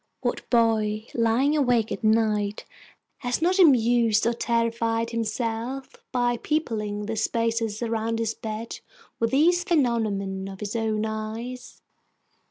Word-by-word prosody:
What - - -3
boy, 220 -2 +2
lying 240 +6 +2
awake 245 -6 +2
at - - -4
night, 215 -2 +1 0.5
has 245 -1 -1
not 360 +4 +2
amused 235 - +4
or 235 - +2
terrified 230 -1 0
himself 230 +3 -3 0.2
by 245 -1 +1
peopling 215 -9 -2
the 220 +1 -3
spaces 230 0 -1
around 225 0 -1
his 225 -1 -1
bed 220 +1 -6 0.4
with 230 - +1
these 340 +7 +3
phenomena 215 - 0
of 190 - -10
his 210 +1 -5
own 220 -1 0
eyes? 220 +3 -6
230 Hz, 125 wpm, -25 LUFS, 220-245 Hz, 0.5 s, amused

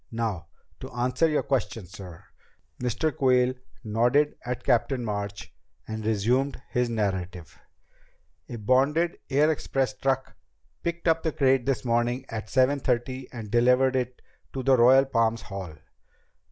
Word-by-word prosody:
Now, 110 -7 -3 0.3
to - - -8
answer 125 +7 +1
your 150 - +1
question, 115 -6 -2
sir." 90 -3 -11 0.6
Mr. 125 +4 -1
Quayle 125 -1 +3 0.3
nodded 120 +7 +2
at 125 0 -4
Captain 125 +1 +1
March 100 -1 -5 0.3
and 110 0 -5
resumed 120 +7 +1
his 125 -2 +1
narrative... 95 -7 -3 0.9
"A 120 - -5
bonded 135 +10 +1
air 145 +3 +3
express 135 -3 -1
truck 135 0 -1 0.5
picked 170 0 -3
up 165 0 +3
the 160 - -1
crate 135 -4 +2
this 135 -1 0
morning 120 +2 0
at 110 -1 -5
seven 130 +4 +3
thirty 130 0 -2
and 110 -4 -8
delivered 125 +2 +4
it 125 -1 -3 0.3
to 130 - -4
the 135 +1 +5
Royal 130 +3 +6
Palms 115 -3 0
Hall. 95 -5 -7
125 Hz, 140 wpm, -26 LUFS, 110-135 Hz, 0.9 s, Royal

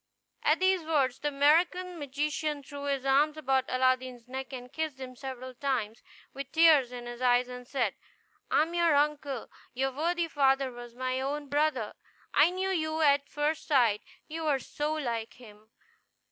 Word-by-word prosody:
At - - +3
these 375 -1 +3
words 275 -5 +1
the 295 - -1
African 340 +5 +2
magician 295 +1 -2
threw 285 +1 -8
his 275 -2 -1
arms 290 +3 +3
about 265 -3 +1
Aladdin's 255 -1 0
neck, 265 +1 -6
and 250 -1 -8
kissed 315 -4 -3
him 255 -1 -7
several 260 -1 -7
times, 240 -5 -2 0.3
with 275 0 -7
tears 315 -6 +5
in 245 -1 -7
his 240 +1 -8
eyes, 245 0 +3
and 250 0 -9
said, 250 -7 0 0.6
"I - - +4
am 330 +2 -6
your 340 -3 +3
uncle. 285 -3 0 0.2
Your 270 +1 0
worthy 335 +5 0
father 270 -3 +2
was 240 -1 -10
my 255 +1 -2
own 285 +1 -3
brother. 285 -6 0 0.4
I 300 +3 +6
knew 375 +1 -2
you 315 -3 -1
at 285 -2 +3
first 295 +2 -1
sight; 240 -8 +3 0.3
you 320 0 -4
are 285 -2 +3
so 295 +4 -3
like 235 -7 -3
him." 215 -3 -16
275 Hz, 170 wpm, -29 LUFS, 255-305 Hz, 0.6 s, I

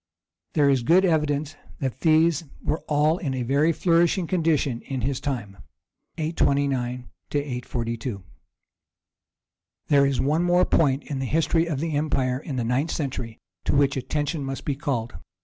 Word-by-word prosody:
There 145 -3 +4
is 135 -3 +3
good 175 +10 +4
evidence 150 -3 0 0.2
that 130 -1 -3
these 160 0 +3 0.2
were 155 - 0
all 150 +3 +2
in 135 -5 -2
a 125 - -2
very 140 +6 +2
flourishing 170 +2 +2
condition 160 -8 0
in 135 -2 -3
his 130 +2 -1
time. 120 -9 -4 0.6
[829 140 -6 0 0.2
42.] 120 -6 -3 1.7
There 140 -1 +5
is 135 -3 -1
one 150 +6 +2
more 175 +1 +3
point 140 -3 +2
in 140 -3 -4
the 135 - -2
history 165 +3 +1
of 150 -5 -2
the 160 0 -2
empire 135 -4 0
in 145 -1 -6
the 125 - -1
ninth 130 +7 0
century 125 -6 -4 0.3
to - - +1
which 140 0 +3
attention 145 +4 -2
must 135 0 -5
be 140 - -1
called. 130 -6 -2
140 Hz, 150 wpm, -25 LUFS, 130-160 Hz, 1.7 s, There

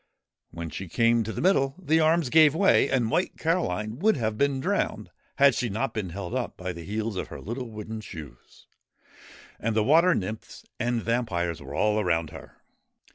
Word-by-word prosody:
When 85 -1 -7
she 95 -2 -6
came 115 +5 +3
to 110 - -4
the - - -4
middle, 135 -8 +2
the 160 -3 +1
arms 160 -3 +2
gave 155 -2 +6
way, 195 +3 +4
and 120 -4 +1
White 180 - 0
Caroline 115 - -1
would 215 -1 +3
have 110 -3 -1
been 140 +2 +1
drowned - - -2 0.2
had 140 -1 +5
she 120 +1 -1
not 110 +7 -2
been 105 -4 -3
held 100 +8 -4
by 90 0 -4
the 85 -1 -9
heels 105 +2 -3
of - - -3
her - - -9
little 120 +3 -5
wooden 110 0 -7
shoes. 75 -11 -12 0.9
And 115 0 -1
the 110 - +3
water 165 +8 +5
nymphs 105 +3 -6
and 120 -1 -1
vampires 90 -9 -1
were 70 +1 -8
all 105 +4 +2
around 85 -5 0
her. - - -13
115 Hz, 185 wpm, -26 LUFS, 95-135 Hz, 0.9 s, gave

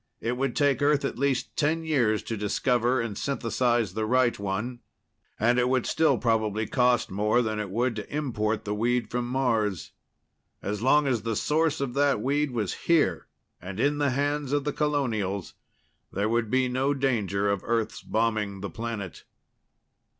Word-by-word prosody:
It 120 +2 -2
would 130 0 -1
take 145 -2 +2
Earth 145 -1 +3
at 130 - -4
least 140 -2 0
ten 160 +2 +1
years 125 -9 +1
to 115 - -4
discover 120 +4 +1
and 115 -3 -3
synthesize 120 -4 0
the 110 +1 -2
right 120 -1 +2
one 105 +5 -3 0.6
and 120 +3 +3
it 125 0 +2
would 130 -2 +1
still 155 -5 +2
probably 110 -2 0
cost 125 -3 +2
more 105 +5 +2
than 110 -1 -2
it 105 -2 -3
would 120 +4 0
to 105 - -7
import 110 -7 -1
the 105 - -2
weed 120 +2 0
from 120 0 -1
Mars. 115 - 0 0.7
As 105 +1 -4
long 145 +4 +4
as 125 -5 +1
the 115 0 -2
source 160 +3 +1
of 135 -3 -2
that 140 -3 +2
weed 145 +5 0
was 110 -6 -2 0.2
here, 165 -3 +3 0.3
and 95 +3 -7
in 145 +3 +1
the 145 -1 +2
hands 145 +1 -1
of 145 -1 +1
the 150 0 -2
colonials, 115 - -1 0.6
there 100 +3 -1
would 115 -1 0
be 130 +1 +2
no 130 +3 0
danger 105 -7 0
of 100 -2 -1
Earth's 115 -2 -1
bombing 110 -3 -1
the 100 - -5
planet. 110 -7 -5
120 Hz, 170 wpm, -27 LUFS, 110-135 Hz, 0.7 s, long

